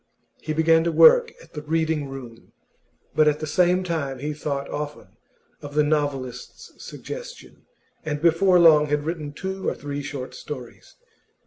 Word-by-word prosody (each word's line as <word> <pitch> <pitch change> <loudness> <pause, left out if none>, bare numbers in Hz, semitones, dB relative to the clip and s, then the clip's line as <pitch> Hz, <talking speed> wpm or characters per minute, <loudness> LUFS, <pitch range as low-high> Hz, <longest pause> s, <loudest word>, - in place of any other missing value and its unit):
He 155 - -4
began 160 +1 +3
to 170 - +1
work 480 - +6
at - - -21
the 150 - -6
Reading 160 -2 -1
room, 125 -4 -11 0.6
but 155 -1 +4
at 150 0 +2
the 155 - -4
same 180 +4 +2
time 155 -7 -3
he 150 +4 -4
thought 140 -2 -4
often 150 0 -6 0.5
of 145 0 -9
the 150 - +4
novelist's 145 -4 -3
suggestion, - - -10 0.4
and 150 -2 -3
before 170 +3 +4
long 155 -3 +6
had 150 0 -1
written 155 -3 -4
two 190 +5 -5
or - - -4
three 145 0 -5
short 135 -2 -6
stories. 130 -5 -10
150 Hz, 155 wpm, -23 LUFS, 145-165 Hz, 0.6 s, work